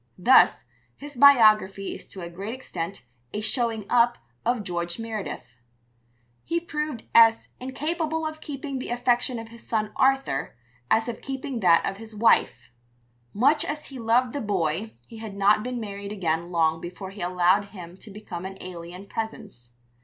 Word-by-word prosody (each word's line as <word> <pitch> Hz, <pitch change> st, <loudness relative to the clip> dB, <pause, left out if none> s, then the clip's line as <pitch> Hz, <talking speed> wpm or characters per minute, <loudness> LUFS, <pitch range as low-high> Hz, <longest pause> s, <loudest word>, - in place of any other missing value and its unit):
Thus, 250 Hz, +8 st, +5 dB, 0.3 s
his 290 Hz, 0 st, -10 dB
biography 215 Hz, -7 st, +5 dB
is -, -, -10 dB
to 190 Hz, -, -10 dB
a 170 Hz, -, -6 dB
great 200 Hz, +7 st, -5 dB
extent 180 Hz, -, -6 dB, 0.3 s
a 210 Hz, -, -2 dB
"showing 225 Hz, -1 st, 0 dB
up" 240 Hz, 0 st, +3 dB, 0.3 s
of 240 Hz, -2 st, 0 dB
George 175 Hz, -2 st, -3 dB
Meredith. 215 Hz, -, -6 dB, 0.9 s
He 340 Hz, -, -1 dB
proved 300 Hz, -7 st, -4 dB
as 225 Hz, 0 st, +6 dB
incapable 315 Hz, +4 st, -2 dB
of 310 Hz, 0 st, -5 dB
keeping 275 Hz, -2 st, -5 dB
the -, -, -6 dB
affection 245 Hz, +1 st, +1 dB
of 225 Hz, 0 st, -7 dB
his 235 Hz, 0 st, -14 dB
son 215 Hz, -2 st, -2 dB
Arthur, 265 Hz, -, +1 dB, 0.3 s
as 225 Hz, +1 st, +3 dB
of 235 Hz, -, -5 dB
keeping 270 Hz, -2 st, -4 dB
that 175 Hz, -5 st, +5 dB
of 195 Hz, -, -3 dB
his 220 Hz, 0 st, -11 dB
wife. 225 Hz, -, +2 dB, 0.6 s
Much 280 Hz, +8 st, +3 dB
as 300 Hz, 0 st, -4 dB
he 270 Hz, -2 st, -8 dB
loved 235 Hz, +2 st, +2 dB
the 285 Hz, -, -3 dB
boy 195 Hz, 0 st, -1 dB
he 230 Hz, -, -12 dB
had 220 Hz, -3 st, -7 dB
not 200 Hz, +2 st, +4 dB
been 250 Hz, +2 st, -4 dB
married 200 Hz, -2 st, -6 dB
again 170 Hz, -4 st, -1 dB
long 160 Hz, -2 st, +1 dB
before 180 Hz, +2 st, -7 dB
he 200 Hz, -, -10 dB
allowed 180 Hz, +3 st, +2 dB
him 180 Hz, -4 st, -11 dB
to 215 Hz, -, -13 dB
become 195 Hz, -4 st, -8 dB
an 190 Hz, 0 st, -7 dB
alien 180 Hz, +1 st, -9 dB
presence. 205 Hz, -, -7 dB
220 Hz, 165 wpm, -25 LUFS, 190-250 Hz, 0.9 s, as